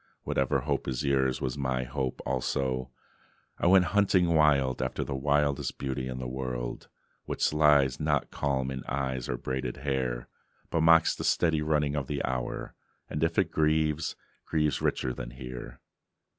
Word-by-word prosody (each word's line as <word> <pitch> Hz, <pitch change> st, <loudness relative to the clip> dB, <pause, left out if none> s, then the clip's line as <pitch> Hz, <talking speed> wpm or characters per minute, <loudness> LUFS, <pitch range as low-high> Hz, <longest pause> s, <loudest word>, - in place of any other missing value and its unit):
Whatever 65 Hz, -1 st, +1 dB
hope -, -, -2 dB
is 65 Hz, +1 st, -2 dB
yours 65 Hz, -2 st, +1 dB
Was 65 Hz, +2 st, -2 dB
my 65 Hz, -1 st, 0 dB
hope 65 Hz, 0 st, -3 dB
also; 65 Hz, 0 st, -1 dB, 0.7 s
I -, -, +2 dB
went 95 Hz, 0 st, +6 dB
hunting 95 Hz, -4 st, +3 dB
wild 70 Hz, -5 st, +3 dB
After 65 Hz, 0 st, -2 dB
the -, -, -4 dB
wildest 70 Hz, +1 st, 0 dB
beauty 65 Hz, -1 st, -3 dB
in 65 Hz, 0 st, -4 dB
the 65 Hz, -1 st, -4 dB
world, 60 Hz, -2 st, -4 dB, 0.4 s
Which -, -, 0 dB
lies 75 Hz, -3 st, +4 dB
not 75 Hz, -2 st, 0 dB
calm 65 Hz, -2 st, -1 dB
in 65 Hz, -1 st, -5 dB
eyes, 65 Hz, -3 st, -2 dB
or -, -, -1 dB
braided 65 Hz, 0 st, -3 dB
hair, 65 Hz, -3 st, -2 dB, 0.4 s
But 80 Hz, -, +1 dB
mocks 80 Hz, 0 st, +6 dB
the -, -, -5 dB
steady 80 Hz, -3 st, +2 dB
running 75 Hz, -1 st, +1 dB
of 70 Hz, -3 st, -2 dB
the 70 Hz, -1 st, -2 dB
hour, 60 Hz, -1 st, -3 dB, 0.4 s
And 75 Hz, -, -1 dB
if 80 Hz, 0 st, 0 dB
it 95 Hz, -4 st, +2 dB
grieves, 80 Hz, 0 st, +1 dB, 0.3 s
grieves 75 Hz, -4 st, 0 dB
richlier 65 Hz, -1 st, -1 dB
than -, -, -6 dB
here. 60 Hz, -1 st, -8 dB
65 Hz, 160 wpm, -29 LUFS, 65-75 Hz, 0.7 s, went